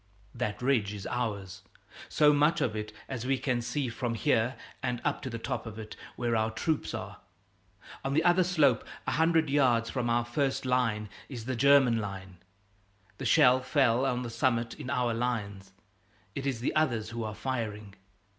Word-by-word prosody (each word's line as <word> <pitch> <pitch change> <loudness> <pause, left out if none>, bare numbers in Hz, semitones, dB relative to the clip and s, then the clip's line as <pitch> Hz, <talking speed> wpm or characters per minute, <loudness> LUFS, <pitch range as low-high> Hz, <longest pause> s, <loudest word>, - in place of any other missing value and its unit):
That 120 -2 -3
ridge 115 -6 +1
is 100 - -7
ours 100 -6 -3 0.5
so 150 -1 +5
much 150 +3 +3
of 110 -3 0
it 105 0 -4 0.2
as 130 -4 -4
we 135 0 +2
can 125 -2 -1
see 125 +3 -2
from 120 0 -3
here 120 -1 +1 0.3
and 125 -2 -2
up - - 0
to 130 - -5
the 115 - -4
top 115 - -4
of 110 -1 -8
it, 110 -1 -8 0.2
where 120 -1 0
our 110 0 +1
troops 145 +7 -2
are. - - -7 0.9
On 135 +1 -1
the 160 - +3
other 175 +1 +5
slope, 155 -9 +3 0.2
a - - -1
hundred 160 0 +3
yards 125 -5 +2
from 125 -3 -1
our 120 0 +2
first 135 +2 -1
line, 115 -4 +1 0.2
is 120 -5 -7
the 130 - -2
first 115 - -5
German 140 -4 +5
line. 95 -3 -6 0.8
The 135 - -4
shell 125 +3 +5
fell 130 -2 +2
on 125 -2 0
the 120 - -5
summit, 120 -2 0
in 130 - -8
our 120 -2 +1
lines; 105 -5 -3 0.6
it 140 +4 -4
is 125 -4 -2
the 125 - -1
others 120 -9 +1
who 115 0 -4
are 105 -1 -5
firing. 105 -3 -4
120 Hz, 185 wpm, -29 LUFS, 110-135 Hz, 0.9 s, so